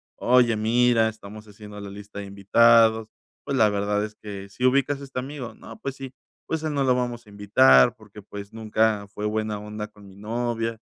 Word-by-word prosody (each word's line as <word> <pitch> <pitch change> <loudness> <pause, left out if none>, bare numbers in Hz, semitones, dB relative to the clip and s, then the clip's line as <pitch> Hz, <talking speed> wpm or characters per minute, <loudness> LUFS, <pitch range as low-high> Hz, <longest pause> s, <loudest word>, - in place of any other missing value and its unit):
"Oye, 120 -2 +3
mira, 115 +1 +3
estamos 110 0 -11
haciendo 105 0 -12
la 100 - -7
lista 100 +1 -10
de 100 - -6
invitados. 110 +3 +4 0.4
Pues, 140 - -2
la 110 -3 +5
verdad 105 0 -1
es 105 - -10
que, 100 -2 -9
¿si 125 - -8
ubicas 140 +2 +2
a - - -8
este 130 - -10
amigo? 130 -3 -7
'No, 115 -1 -12
pues, 135 -1 -5
sí'. 135 -1 -9 0.3
Pues, 160 -1 -3
a - - -1
él 155 - -3
no 140 -1 0
lo 130 -1 +3
vamos 120 -1 -3
a - - -18
invitar, 100 - +5
porque, 105 -2 -14
pues, 100 +1 -10
nunca 110 -1 0
fue 105 +1 -6
buena 110 0 -2
onda 105 0 -6
con 105 -1 -17
mi 95 - -15
novia, 115 +1 -3
110 Hz, 210 wpm, -24 LUFS, 105-120 Hz, 0.4 s, la